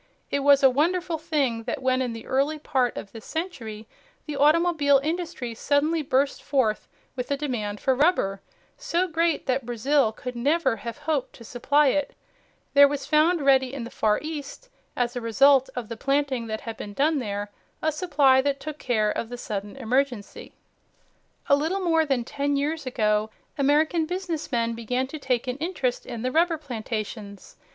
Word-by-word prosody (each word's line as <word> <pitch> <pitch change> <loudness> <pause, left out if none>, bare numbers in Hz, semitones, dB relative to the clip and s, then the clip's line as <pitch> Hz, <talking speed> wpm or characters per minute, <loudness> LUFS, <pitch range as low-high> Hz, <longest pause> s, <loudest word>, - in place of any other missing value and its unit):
It 280 - +1
was 280 0 +5
a 270 - +8
wonderful 335 +4 0
thing 290 -8 0
that 240 - -3
when 260 0 +2
in 250 -2 -1
the 225 -1 -8
early 280 +4 0
part 260 -5 0
of 195 - -7
this 225 -2 -10
century 230 - -5 0.4
the 300 - -5
automobile 300 -1 +4
industry 320 -7 -3
suddenly 295 +7 +1
burst 275 0 0
forth 250 -7 0 0.3
with 250 -1 -4
a 280 - 0
demand 220 -8 -3
for 265 - +2
rubber 255 - +1 0.4
so 355 +2 0
great 330 -1 0
that 260 0 0
Brazil 245 +1 +1
could 250 +2 -7
never 270 0 +1
have 235 +1 -7
hoped 295 -3 -2
to 235 - -13
supply 275 +5 +2
it, 290 +2 -1 0.6
there 285 0 +8
was 280 -1 -4
found 315 +2 +3
ready 265 -2 +4
in 260 - -4
the 235 - -8
Far 210 -1 +1
East, 310 - -7 0.3
as 245 0 -1
a 245 - -3
result 265 +4 +4
of 245 -3 -4
the 230 - -6
planting 275 -2 0
that 220 0 -4
had 225 -1 -7
been 205 - -7
done 300 +1 +2
there, 205 -3 -4 0.3
a 315 - +2
supply 285 -5 +3
that 280 0 -1
took 305 +2 -7
care 215 -4 +1
of 225 - -4
the 245 - -6
sudden 205 -2 -5
emergency. 250 -3 -2 1.0
A 280 - +6
little 320 +7 -1
more 325 -3 +2
than 265 -4 +1
ten 280 +3 -2
years 295 +1 -2
ago 215 -3 +1 0.3
American 310 +3 +2
business 360 -4 -4
men 230 -2 0
began 245 +3 -2
to 300 +4 -8
take 255 -3 -1
an 250 +1 -2
interest 300 -6 -2
in 235 -1 -6
the 255 - -1
rubber 330 +2 +2
plantations. 215 -6 -6
275 Hz, 180 wpm, -25 LUFS, 235-305 Hz, 1.0 s, a